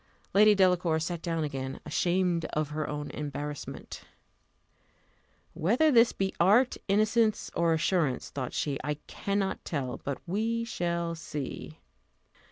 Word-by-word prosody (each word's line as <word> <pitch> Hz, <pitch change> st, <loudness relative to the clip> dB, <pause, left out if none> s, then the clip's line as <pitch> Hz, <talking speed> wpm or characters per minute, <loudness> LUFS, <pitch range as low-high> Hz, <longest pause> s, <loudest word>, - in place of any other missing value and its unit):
Lady 210 Hz, +1 st, +7 dB
Delacour 180 Hz, -4 st, +3 dB
sat 165 Hz, +1 st, -3 dB
down 165 Hz, -2 st, -1 dB
again, 135 Hz, -3 st, -4 dB
ashamed 175 Hz, +2 st, +1 dB
of 155 Hz, -1 st, 0 dB
her 155 Hz, 0 st, -2 dB
own 145 Hz, 0 st, -4 dB
embarrassment. 145 Hz, -1 st, -6 dB, 1.5 s
Whether 230 Hz, -, +3 dB
this 235 Hz, -2 st, +6 dB
be 195 Hz, 0 st, -2 dB
art, 215 Hz, +9 st, +5 dB
innocence, 215 Hz, +2 st, +2 dB
or 170 Hz, 0 st, +2 dB
assurance, 160 Hz, -5 st, +1 dB
thought 130 Hz, -3 st, -4 dB
she, 140 Hz, -2 st, -2 dB
I 150 Hz, +2 st, -1 dB
cannot 200 Hz, -1 st, -2 dB
tell; 135 Hz, -6 st, -3 dB
but 140 Hz, -1 st, -2 dB
we 225 Hz, +6 st, -1 dB
shall 170 Hz, -6 st, -2 dB
see. 150 Hz, -4 st, -6 dB
170 Hz, 125 wpm, -29 LUFS, 150-200 Hz, 1.5 s, Lady